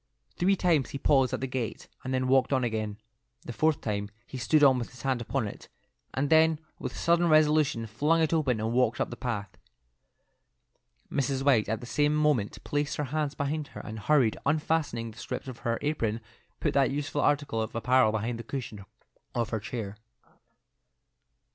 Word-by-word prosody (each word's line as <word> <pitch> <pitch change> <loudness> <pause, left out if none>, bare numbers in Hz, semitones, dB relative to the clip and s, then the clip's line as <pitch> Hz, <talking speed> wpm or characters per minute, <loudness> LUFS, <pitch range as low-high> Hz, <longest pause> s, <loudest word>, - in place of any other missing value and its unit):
Three 195 +3 +3
times 165 -7 +2
he - - -4
paused 135 -2 +3
at - - -3
the - - 0
gate, 125 -3 -4 0.2
and 130 - -4
then 130 0 0
walked 130 +1 +3
on 130 -2 +2
again. 110 -3 -2 0.5
The 120 - -5
fourth 155 +4 +1
time 100 -2 -2 0.2
he - - -10
stood 135 +7 +3
with 130 -4 +4
his 125 - -13
hand 130 -3 0
upon 120 -1 -1
it, - - -10 0.4
and 140 +2 -1
then 160 0 +5 0.2
with 130 - -5
sudden 170 0 +3
resolution 150 -5 +3
flung 150 +10 +1
it 160 0 +2
open 135 -8 +1
and 110 +2 -1
walked 125 +1 +2
up - - -1
the - - -5
path. 105 -6 -4 1.6
Mrs. 135 -1 0
White 120 -7 +4
at 110 +1 -1
the - - -7
same 145 +4 +1
moment 150 -9 +1
placed 145 -1 -1
her 150 - -1
hands 150 -2 -1
behind 145 +1 -2
her, - - -5
and 110 0 -7
hurriedly 130 -1 +2
unfastening 145 -6 0
the 110 - -14
strings - - -5
of 130 -3 -7
her 115 0 -1
apron, 115 -7 -1 0.4
put - - 0
that 135 -2 +3
useful 145 +1 -2
article 145 -6 +1
of 110 - -4
apparel 125 0 +3
beneath 110 +2 -2
the 115 - -7
cushion 115 -5 -6 0.5
of 115 -2 0
her 110 - -1
chair. 105 -2 -5
130 Hz, 185 wpm, -28 LUFS, 115-150 Hz, 1.6 s, then